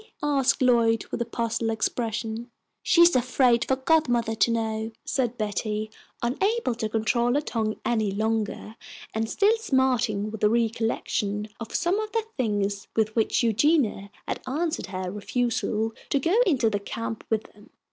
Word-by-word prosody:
asked 275 -3 +2
Lloyd, 230 -2 +3
with - - -3
a - - +1
puzzled 230 0 -2
expression. 225 +1 -2 0.3
"She's 340 -2 +5
afraid 250 -1 +3
for 265 - +3
godmother 260 -5 +2
to 225 - +2
know," 220 -1 -1
said 245 -3 -1
Betty, 215 +1 -2 0.3
unable 385 - +1
to 225 -2 -3
control 235 +3 +1
her 290 - +2
tongue 220 -6 -2
any 220 -3 +1
longer, 220 +1 -2 0.4
and 225 0 -1
still 420 +2 +3
smarting 250 - +1
with 220 - -7
the 210 - +5
recollection 225 -2 -1
of 230 - -7
some 355 +4 +1
of 430 -1 -4
the 455 -1 +1
things 205 -5 -1
with 215 -1 +1
which 225 +1 +2
Eugenia 230 -3 +2 0.2
had - - -3
answered 320 +5 -2
her 185 -1 -4
refusal 225 +1 -1 0.2
to - - +2
go 330 +7 0
into 260 -9 +3
the 205 -2 0
camp 225 +2 -5
with 220 -1 +1
them. 205 - -19
230 Hz, 155 wpm, -26 LUFS, 215-255 Hz, 0.4 s, She's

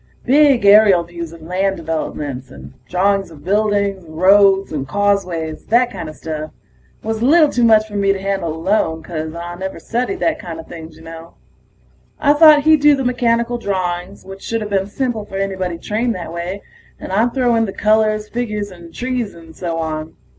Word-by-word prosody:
Big 275 -4 +4
aerial 200 -3 +6
views 170 -1 -8
of 165 -1 -13
land 190 +3 -1
developments, 150 -5 -4
and - - -12 0.2
drawings 195 +2 +1
of 155 -3 -14
buildings, 200 -1 0
roads 195 +4 +4
and 140 -3 -4
causeways, 180 -5 -1
that 245 +2 +3
kinda 160 -8 -6
stuff. 155 0 -6 0.5
Was 225 0 -3
a - - +1
little 310 +2 +5
too 245 - 0
much 220 -2 +5
for 210 - -14
me 200 -1 +2
to 195 - -2
handle 195 -4 -2
alone, 160 -1 -1
'cause 160 -1 -5
I 170 +1 -6
never 190 +1 -5
studied 250 +11 -2
that 325 - 0
kinda 165 -2 -7
things, 160 -1 -11
ya 160 - -15
know. 165 0 -11 0.9
I 290 0 +4
thought 300 -1 +7
he'd 310 -1 +4
do 295 0 +6
the 270 -1 -3
mechanical 240 -1 0
drawings, 185 -2 -3
which 195 0 -10
shoulda 225 -2 -3
been 195 -2 -1
simple 235 0 -2
for 195 -2 -8
anybody 190 -3 -2
trained 225 +7 -2
that 170 -2 -7
way, 175 +4 -5 0.4
and - - -8
I'd 225 +6 +1
throw 250 -3 +2
in 225 -1 +2
the - - -4
colors, 215 0 +1
figures 210 -4 -4
and 170 -2 -13
trees 245 -1 -3
and 165 -1 -14
so 170 -2 -4
on. 155 -1 -4
195 Hz, 185 wpm, -18 LUFS, 170-225 Hz, 0.9 s, thought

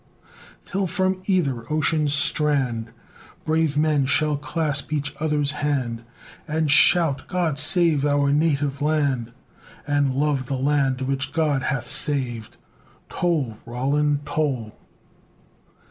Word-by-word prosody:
till 195 0 -2
from 185 +2 -1
either 140 - -1
ocean's 155 -1 +1
strand, 140 -5 +1 0.6
Brave 160 -2 +1
men 150 -3 +2
shall 150 +2 +1
clasp 145 0 -2
each 145 -2 -2
other's 150 -2 0
hand, 135 -6 -2 0.5
And 155 -1 0
shout, 155 -1 +4
"God 170 -6 -1
save 160 -2 +4
our 145 -1 +2
native 145 -2 0
land!" 140 -6 0 0.5
And 145 -2 0
love 140 -2 0
the 135 - -2
land 135 -1 0
which 135 +1 -2
God 150 -4 +1
hath 135 -2 -2
saved! 120 -7 0 0.5
Toll! 145 -11 -1
Roland, 145 +4 -1
toll! 135 -10 -2
145 Hz, 115 wpm, -23 LUFS, 135-155 Hz, 0.6 s, shout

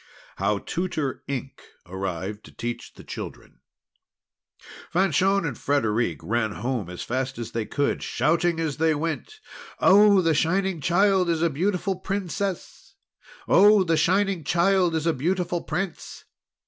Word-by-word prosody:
HOW 100 +2 +1
TUTOR 155 - -3
INK 135 0 -5 0.2
ARRIVED 95 +3 -5
TO - - -14
TEACH 120 0 -5
THE - - -13
CHILDREN - - -9 1.3
Fanchon 195 +1 +2
and 140 -6 -3
Frederic 115 - 0
ran 110 -1 -1
home 120 -5 -3
as 90 - -6
fast 130 +2 -3
as 115 -1 -6
they 115 -2 -3
could, 145 - -1
shouting 170 +1 +1
as 160 -4 -2
they 160 0 +2
went: 165 - -4 0.4
"Oh! 200 0 +6
the 165 -2 +2
Shining 180 +3 0
Child 185 +2 +3
is 165 -1 +1
a 170 - +2
beautiful 185 +4 -1
Princess!" 190 0 -4 0.5
"Oh! 205 -1 +6
the 165 -2 +1
Shining 190 +2 +1
Child 175 +1 +2
is 160 0 -1
a 165 - +2
beautiful 175 +4 -1
Prince!" 190 -2 -5
165 Hz, 135 wpm, -25 LUFS, 130-190 Hz, 1.3 s, Oh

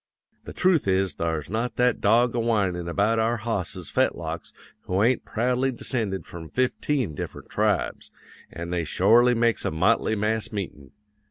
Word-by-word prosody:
The - - -8
trooth 180 - +2
is 95 -1 +1
thar's 80 -3 -2
not 115 +4 -2
that 125 -1 +2
dog 115 +3 +4
a 120 - 0
whinin' 100 -7 0
about 105 +5 +1
our 115 +2 +1
hosses' 100 -6 -4
fetlocks - - -1 0.3
who 95 +3 +1
ain't 125 +2 +2
proudly 125 +3 0
descended 110 -5 -3
from 80 -2 -9
fifteen 130 - 0
different - - -7
tribes, - - 0 0.4
an' 85 +1 -6
they 85 -1 0
shorely 115 +10 +4
makes 115 0 +2
a - - 0
motley 105 +7 +2
mass 105 0 -1
meetin'. 85 - -6
110 Hz, 155 wpm, -25 LUFS, 90-120 Hz, 0.4 s, dog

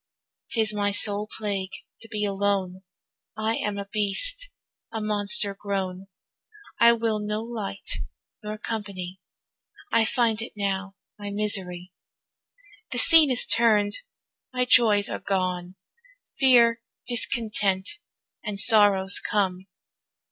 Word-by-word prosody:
'Tis 220 -2 +1
my 205 -1 0
sole 205 +1 +3
plague 200 -3 -3 0.3
to 225 - -11
be 210 -1 -3
alone, 195 -2 -2 0.6
I 220 +1 -1
am 205 -1 -3
a 200 - -5
beast, 235 - -1 0.4
a 220 - -4
monster 205 -1 +1
grown, 195 -2 -5 0.7
I 235 - +7
will 225 -2 -1
no 210 +1 -3
light 220 -4 -4 0.4
nor 210 0 -6
company, 195 -5 -6 0.7
I 225 -1 +3
find 225 -2 0
it 230 - -8
now 195 -1 -3 0.2
my 205 0 -6
misery. 190 -3 -1 1.0
The - - -4
scene 320 -3 +5
is 250 -2 +4
turn'd, 210 -3 +2 0.5
my 250 -1 -1
joys 215 -5 +4
are - - -4
gone, 185 -2 -3 0.6
Fear, 235 -3 +4 0.3
discontent, 220 - 0 0.4
and 210 -3 -4
sorrows 200 -3 +5
come. 190 -2 -2
205 Hz, 115 wpm, -25 LUFS, 195-225 Hz, 1.0 s, I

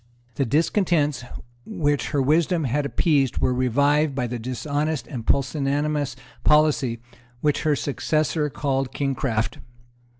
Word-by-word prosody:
The 135 +4 0
discontents 150 - +1 0.4
which 145 - -1
her 140 -3 +1
wisdom 165 +4 +2
had 140 +2 0
appeased 140 -4 +1
were 125 - +2
revived 140 +4 +2
by 125 -2 -1
the 120 0 -4
dishonest 145 +5 -2
and 125 -7 -7
pusillanimous 145 +1 0 0.3
policy 150 -5 +3 0.4
which 150 -1 +1
her 155 -2 +2
successor 150 +1 0
called 135 -2 -2
Kingcraft. 135 -5 -1
145 Hz, 120 wpm, -23 LUFS, 130-150 Hz, 0.4 s, policy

